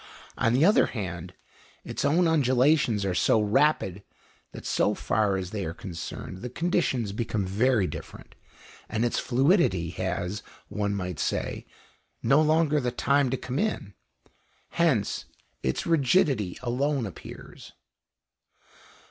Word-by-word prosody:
On 115 - +1
the 135 +6 +4
other 205 - +5
hand, 90 -5 -6 0.5
its - - -4
own 165 +5 +3
undulations 130 -6 +3
are 95 - 0
so 110 - +3
rapid 105 - +2 0.5
that - - -10
so - - +1
far 100 -2 +1
as 95 -1 -5
they 105 -2 -3
are 80 -1 -5
concerned 95 +1 -7
the 125 - -6
conditions 130 - 0
become 110 -1 -2
very 110 +3 +2
different, - - -8 0.6
and 115 +1 0
its 120 - 0
fluidity 125 - +2
has, 95 +2 -3 0.3
one 100 -1 -1
might 90 -5 -4
say, - - -2 0.6
no 140 +3 +5
longer 155 -1 +3
the 125 -3 -1
time 140 +2 +1
to 130 - -1
come 130 +3 -4
in. 210 - -2 0.8
Hence 150 -12 +1 0.4
its 65 - -1
rigidity 140 - +2
alone 130 +1 0
appears. 95 - -10
120 Hz, 130 wpm, -27 LUFS, 95-145 Hz, 0.8 s, other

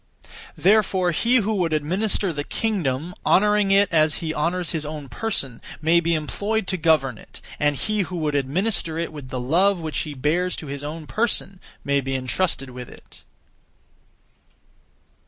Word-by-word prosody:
Therefore 190 -2 +3
he 235 +9 +2
who 220 -3 +2
would 170 -4 0
administer 185 +5 +1
the 145 -1 -3
kingdom, 170 - -2
honouring 210 0 +3
it 200 +1 +5
as 155 -1 +4
he 160 -2 -3
honours 170 +3 -1
his 160 -2 -2
own 150 -2 -6
person, 135 - -2 0.2
may 165 +3 +4
be 170 0 +1
employed 205 +8 -1
to 190 - 0
govern 155 -8 +2
it, - - -12 0.2
and 145 0 +2
he 215 +9 -1
who 185 -2 -2
would 155 -3 -1
administer 160 +4 0
it 165 -1 -3
with 145 -4 -9
the 130 - -4
love 175 +9 +2
which 160 -2 -3
he 150 -2 -4
bears 165 +7 0
to - - -7
his 140 0 -6
own 155 +2 -6
person 210 -1 0 0.2
may 140 0 +1
be 135 0 -3
entrusted 130 +1 -1
with 125 -1 -8
it. - - -15
165 Hz, 165 wpm, -23 LUFS, 145-195 Hz, 0.2 s, it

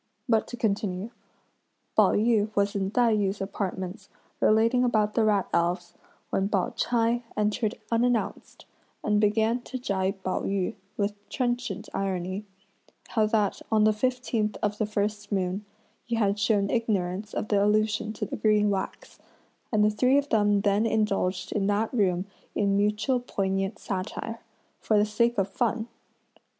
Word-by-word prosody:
But 225 -3 +2
to 245 - -7
continue. 205 -1 -1 0.8
Pao - - +5
yü 215 -1 +2
was 200 0 +1
in 195 -1 0
Tai 230 0 +3
yü's 200 -1 0
apartments 195 0 -4 0.3
relating 230 +3 +4
about 215 -4 +2
the 230 - +2
rat 210 -3 +2
elves, 175 +1 0 0.4
when 195 +1 +1
Pao 195 -4 0
ch'ai 235 0 +1 0.2
entered 210 +2 0 0.2
unannounced, 235 0 -1 0.4
and 210 0 +2
began 220 +3 +2
to 255 - -6
gibe 195 -6 -1
Pao 185 - -1
yü, 195 -2 -1 0.2
with 205 0 0 0.2
trenchant 245 0 -2
irony: 190 +1 -2 0.6
how 220 -2 +2
that 210 -2 +1
on 215 -1 +4
the 215 0 +5
fifteenth 230 -2 -1
of 210 0 0
the 215 - +1
first 210 0 -2
moon, 190 +1 -1 0.4
he 235 - -2
had 205 -2 +1
shown 205 -1 +2
ignorance 210 -3 -1
of - - -2
the 200 -1 +3
allusion 215 +1 +1
to - - -3
the - - -5
green 210 -1 +3
wax; 195 -1 -4 0.5
and 210 -2 +4
the 210 - +3
three 255 +5 +3
of 285 0 0
them 205 -2 +3
then 205 +2 +2
indulged 200 -4 0
in 195 -2 0
that 210 +3 0
room 185 -5 +1 0.3
in 200 -1 +2
mutual 210 +5 +1
poignant 195 -4 -2
satire, 210 +3 -4 0.4
for 215 - +2
the 205 - +4
sake 235 +3 +1
of 195 -1 +2
fun. 230 +1 -1
210 Hz, 155 wpm, -27 LUFS, 200-225 Hz, 0.8 s, Pao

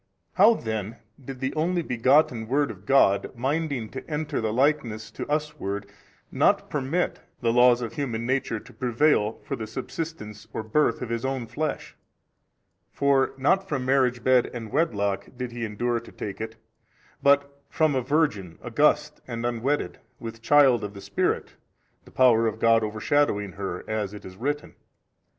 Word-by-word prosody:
Then 110 - +3
how - - -18 0.3
did 130 0 -8
the 130 0 -1
Only 170 +2 0
begotten 125 -2 +2
Word 140 +4 +1
of 100 0 -14
God, 125 -5 +3
minding 135 -1 -1
to 130 - -8
enter 150 -3 -2
the 110 -1 -1
likeness 125 -4 0
to - - -6
us 150 0 -1
ward, 100 +1 -3 0.5
not - - +2
permit 150 +5 -1 0.2
the 115 -2 +2
laws 125 0 +5
of 115 - -5
human 120 -6 -3
nature 130 -3 0
to - - -16
prevail, 120 -3 +1
for - - -3
the 110 - -6
subsistence 110 -3 -6
or 110 - -3
birth 115 +2 +1
of 120 - -5
His 115 0 -2
own 130 -2 -2
flesh: 145 +6 -4 1.0
for 140 -1 +2
not 190 +8 +2
from 135 -4 -2
marriage 130 -2 +2
bed 130 -1 +4
and 115 -3 -6
wedlock 100 - 0
did 125 -1 -4
He 120 -1 -5
endure 120 +3 -1
to 115 - -14
take 100 0 -6
it 110 0 -5 0.7
but 140 0 +2
from 155 -2 +2
a 130 - +1
Virgin 120 - 0
august 150 +5 +1
and 115 -1 -4
unwedded, 120 +5 -1 0.2
with 115 0 -8
child 130 -3 +5
of 100 0 -6
the 100 - -9
Spirit, - - -1 0.5
the - - -16
Power 115 -3 +4
of 110 -1 -2
God 115 0 +4
over 110 0 -4
shadowing 105 -8 +1
her, 95 -2 -5
as 105 -2 -2
it 105 - -11
is 95 - -10
written. 145 +8 -3
125 Hz, 170 wpm, -26 LUFS, 110-145 Hz, 1.0 s, laws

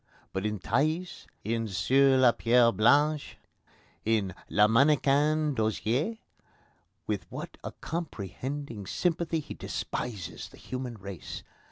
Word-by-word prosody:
But 95 +2 -1
in 105 0 -2
Thaïs, 155 - -1 0.2
in 115 +1 -1
Sur 130 +8 +4
la 130 -2 +6
Pierre 115 0 +4
Blanche, 145 +7 +3 0.7
in 105 -4 +1 0.2
Le 105 +1 +5
Mannequin 145 +4 +3
d'Osier, 110 - 0 0.9
with - - -3
what - - -6
a - - -4
comprehending 130 - -5
sympathy 170 - 0
he 150 - -7
despises 100 -9 -5
the - - -16
human 125 -2 -5
race! 100 -5 -8
125 Hz, 115 wpm, -29 LUFS, 105-145 Hz, 0.9 s, la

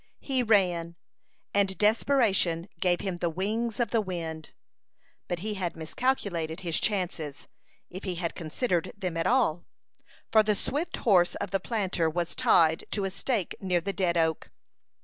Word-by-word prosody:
He 265 -2 0
ran, 180 -7 +2 0.6
and 195 -1 +2
desperation 210 -6 +2
gave 180 -1 +2
him 190 -3 -3
the 170 0 0
wings 215 +7 -2
of 235 -3 0
the 230 - +3
wind; 165 -5 -5 0.8
but 175 -2 -3
he 215 +2 -2
had 180 -4 -3
miscalculated 170 -3 -1
his 170 -3 0
chances, 175 -8 -2 0.4
if 185 +2 -8
he 185 -3 -2
had 170 -1 -2
considered 170 +2 -1
them 185 -4 -3
at 165 - 0
all, 205 -10 +2 0.7
for 220 - +7
the 210 -1 +1
swift 295 - -2
horse 180 -6 +3
of 195 - -4
the 195 - +1
planter 190 -6 0
was 170 +1 -2
tied 165 -11 +4
to 200 -2 -1
a 190 - -2
stake 210 -2 -1
near 180 -2 +1
the 195 +3 -3
dead 180 -4 +1
oak. 160 -1 0
185 Hz, 160 wpm, -28 LUFS, 170-215 Hz, 0.8 s, for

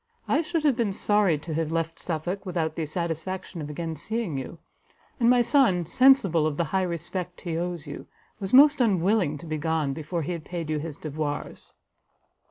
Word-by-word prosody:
I 310 - +3
should 330 -1 -2
have 290 -5 +4
been 225 -5 0
sorry 205 -5 +2
to 160 +2 -6
have 160 0 -1
left 165 0 -2
Suffolk 175 +4 -3
without 165 -4 -2
the 160 -2 -2
satisfaction 170 +2 -4
of 150 - -6
again 160 +2 -4
seeing 215 +1 -3
you; 135 +5 -5 0.6
and 235 -1 +4
my 245 0 +5
son, 230 - +3
sensible 195 - +4
of 150 -2 -3
the 170 - +2
high 190 - +3
respect 180 +1 -4
he 170 -2 -3
owes 175 -1 -3
you, 145 - -8 0.3
was 195 -1 -4
most 285 +1 +7
unwilling 190 -6 +2
to 145 - -11
be 155 -1 -3
gone, 155 -3 0
before 160 +3 -3
he 155 - -3
had 170 -3 -4
paid 165 -3 -5
you 155 - 0
his 155 -1 -6
devoirs." 150 -1 -5
170 Hz, 190 wpm, -26 LUFS, 155-195 Hz, 0.6 s, most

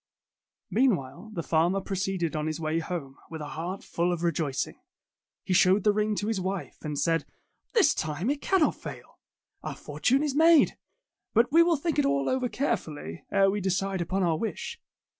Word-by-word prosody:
Meanwhile 190 - +1
the 170 - -2
farmer 170 +5 +2
proceeded 190 -4 -2
on 155 0 -1
his 155 +1 -3
way 160 0 0
home, 160 -5 -5
with 160 - -6
a 150 -1 -6
heart 175 +5 -5
full 175 +1 0
of 175 -1 -3
rejoicing. 155 -5 -1 0.6
He 185 - -1
showed 185 +2 +5
the 210 - +4
ring 210 0 +1
to 205 - -2
his 220 -4 -1
wife, 190 +1 -4
and 150 -2 -4
said, 165 0 +1 0.5
"This 450 -5 +5
time 155 - -2
it 290 0 -3
cannot 380 -5 +3
fail! - - -10 0.4
Our - - -5
fortune 270 +4 0
is 295 -3 0
made. 320 +1 +5 0.6
But 235 +5 +4
we 330 +3 +7
will 335 -1 +4
think 310 +1 -1
it 290 - +3
all 140 -1 +1
over 255 -1 0
care 260 +6 +1
fully, 115 - -9
ere 195 -1 +4
we 205 +1 -2
decide 190 0 -1
upon 185 +3 -1
our 165 -3 +1
wish." 230 - -4
190 Hz, 185 wpm, -28 LUFS, 160-230 Hz, 0.6 s, we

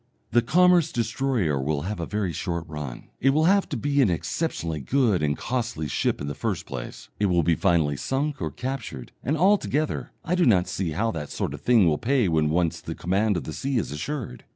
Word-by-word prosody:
The 120 - +5
commerce 175 +5 +4
destroyer 115 - 0
will 70 +1 -1
have 100 +2 -4
a 85 - -3
very 105 -5 -2
short 85 +1 -3
run; 75 -5 -7
it 135 - +3
will 150 +3 +3
have 195 +4 +3
to 140 - -2
be 140 +4 +1
an 120 - +4
exceptionally 85 - -2
good 110 - +2
and 75 -1 0
costly 120 -10 -2
ship - - 0
in 70 - -4
the 70 - -3
first - - -3
place, - - -7
it 105 - +3
will 90 -2 +2
be 85 - +3
finally 80 -5 +2
sunk 140 - -2
or 80 - -1
captured, 125 - -5
and 150 +5 0
altogether 175 -4 +1 0.2
I 170 - 0
do 180 -4 +3
not 95 -6 +4
see 90 -1 -2
how 115 +8 0
that 75 -7 -5
sort - - -3
of - - -8
thing 120 -6 +5
will 75 -3 +2
pay 125 -3 +2
when 80 -3 +2
once 85 +1 0
the - - -6
command 100 +3 +1
of 80 - -3
the 80 - -6
sea 135 - -1
is 105 - -1
assured. 110 - -5
105 Hz, 220 wpm, -25 LUFS, 80-135 Hz, 0.2 s, The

